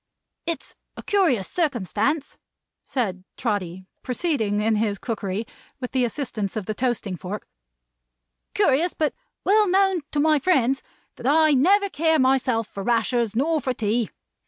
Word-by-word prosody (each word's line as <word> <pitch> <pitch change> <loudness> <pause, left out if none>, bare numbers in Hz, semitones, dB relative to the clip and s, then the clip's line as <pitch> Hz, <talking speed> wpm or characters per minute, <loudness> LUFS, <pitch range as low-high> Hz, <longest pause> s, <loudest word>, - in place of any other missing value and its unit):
It's 335 - -4 0.2
a - - -7
curious 320 - +2
circumstance," 275 - -1 0.4
said 190 -8 -2
Trotty, 190 -5 -2 0.2
proceeding 250 -7 0
in 215 +1 +2
his 210 -2 0
cookery, 210 -1 -3 0.3
with 250 -2 -5
the 255 -2 +2
assistance 225 -6 -3
of 215 -3 -3
the 215 - -2
toasting 235 -5 -1
fork, 190 +4 -6 1.1
"curious, 325 +7 +2
but 305 -2 0 0.3
well 420 0 +4
known 385 -1 +3
to 295 - 0
my 305 0 +4
friends, 270 -5 +2 0.4
that 245 - -4
I 310 +2 +5
never 390 +10 +4
care, 320 -3 +2
myself, 260 -4 +2
for 200 - -7
rashers, 230 0 +1
nor 310 +5 +1
for 255 -1 -1
tea. 225 +1 0
250 Hz, 140 wpm, -24 LUFS, 215-310 Hz, 1.1 s, I